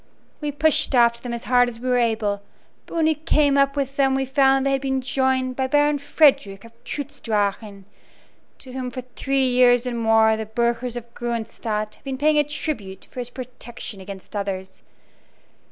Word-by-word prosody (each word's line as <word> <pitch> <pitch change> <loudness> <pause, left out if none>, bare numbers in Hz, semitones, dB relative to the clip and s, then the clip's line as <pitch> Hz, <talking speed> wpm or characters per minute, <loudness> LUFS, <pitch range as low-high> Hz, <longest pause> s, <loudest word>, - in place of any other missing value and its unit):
We 295 -1 -3
pushed 290 -1 +2
after 235 -1 +4
them 245 - -5
as 235 -1 -4
hard 245 -1 +3
as 230 -1 -10
we 255 - -5
were 250 -1 +3
able, 220 -3 0 0.5
but - - -9
when 325 -1 +2
we 315 - +4
came 300 -2 +2
up 275 0 +3
with 275 -1 -3
them 270 -1 +3
we 270 0 0
found 270 0 +3
that - - +2
they - - +1
had 270 - 0
been 265 -1 0
joined 260 -1 0
by 265 0 -1
Baron 290 +1 +2
Frederick 265 -9 +2
of 230 - -13
Trutz 285 +1 -6
Drachen, 205 -2 -2 0.7
to 260 - -12
whom 255 -1 -4
for 255 +1 -6
three 270 -1 +1
years 245 -1 +4
and 240 -2 -3
more 225 -1 +4
the 220 -1 -5
burghers 235 +2 -1
of 235 -1 -8
Gruenstadt 220 -2 -3
have - - -21
been 270 -1 -4
paying 300 +2 +3
a - - +4
tribute 270 - -5
for - - -8
his 245 -1 -4
protection 240 -5 -8
against 195 +2 -10
others. 190 -2 -4
250 Hz, 195 wpm, -23 LUFS, 225-275 Hz, 0.7 s, after